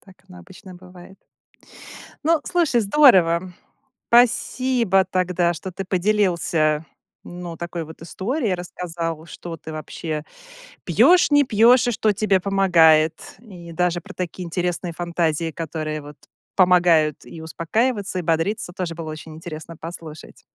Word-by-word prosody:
Так 190 -1 -20
оно 180 -1 -13
обычно 185 +1 -14
бывает. 180 +1 -15 1.0
Ну, 325 -1 +3
слушай, 320 -9 +1
здорово. 185 - +4 0.6
Спасибо 240 -3 +3
тогда, 180 -1 +1
что 180 +3 -7
ты 195 +2 -5
поделился, 175 -5 +1 0.4
ну, 175 -1 -8
такой 170 -1 -5
вот 160 +1 -13
историей, 210 - -2
рассказал, 170 -2 -5
что 170 0 -8
ты 160 +1 -10
вообще 155 0 -5 0.6
пьешь, 355 -3 +4
не 290 0 +5
пьешь, 245 +2 +4
и - - +2
что 215 -1 +1
тебе 200 -1 +1
помогает. 170 -5 +4 0.2
И 180 -7 -12
даже 175 0 0
про 200 +1 -12
такие 180 0 -5
интересные 175 0 -3
фантазии, 170 -2 -1
которые 155 -1 -5
вот 145 +1 -12 0.4
помогают 175 -5 +3
и 165 - -10
успокаиваться, 195 +5 -2
и - - -2
бодриться, 165 +4 -1
тоже 175 -4 -4
было 165 -2 -6
очень 155 0 -9
интересно 160 0 -9
послушать. 160 -2 -10
180 Hz, 130 wpm, -22 LUFS, 165-200 Hz, 1.0 s, не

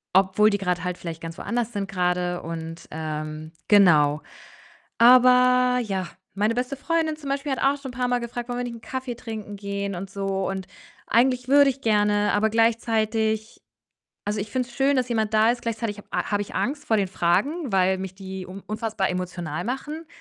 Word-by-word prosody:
“obwohl 195 +3 +5
die 205 - +1
grad 180 -3 -1
halt 180 0 -3
vielleicht 165 -1 -6
ganz 165 +1 -7
woanders 240 -1 -2
sind 200 -1 -3
grade” 180 -1 0
und, 165 0 -6
ähm 155 0 -5 0.2
genau. 155 -8 +5 0.8
Aber, 250 +1 +6
ja, 190 -5 -3 0.3
meine 210 +3 +1
beste 250 +3 -2
Freundin 320 +2 0
zum 285 -3 -7
Beispiel 280 +1 -2
hat 265 - -1
auch 275 +1 +2
schon 265 - -6
'n 245 - -15
paar 250 -1 +1
Mal 245 0 +1
gefragt: 240 0 -6
„Wollen 245 - -2
wir - - -1
nicht 240 -1 -5
'n 230 - -12
Kaffee 260 -1 -5
trinken 215 -3 -7
gehen“ 200 0 -3
und 190 +2 -6
so. 195 -1 -2
Und 190 -1 -4 0.4
eigentlich 250 +1 +2
würde 285 0 +6
ich 270 0 -5
gerne, 210 -1 +2
aber 215 +1 +2
gleichzeitig 220 -1 0 0.6
also, 210 +1 -2
ich 205 - -6
finde 255 -1 -1
es 240 - -14
schön, 275 +1 +3
dass 255 -1 0
jemand 220 -2 0
da 220 +1 +5
ist, 240 0 -2
gleichzeitig 225 -2 -3
ich - - -11
ha - - -1
habe 205 -1 +1
ich 205 - -10
Angst 290 +3 -2
vor 220 - +2
den 195 -2 +1
Fragen, 210 - 0
weil 190 0 +3
mich 190 -1 -6
die 190 -1 -7
un 190 +2 -9
unfassbar 215 -2 -2
emotional 175 -3 -4
machen 295 +6 -4
215 Hz, 200 wpm, -24 LUFS, 190-245 Hz, 0.8 s, Aber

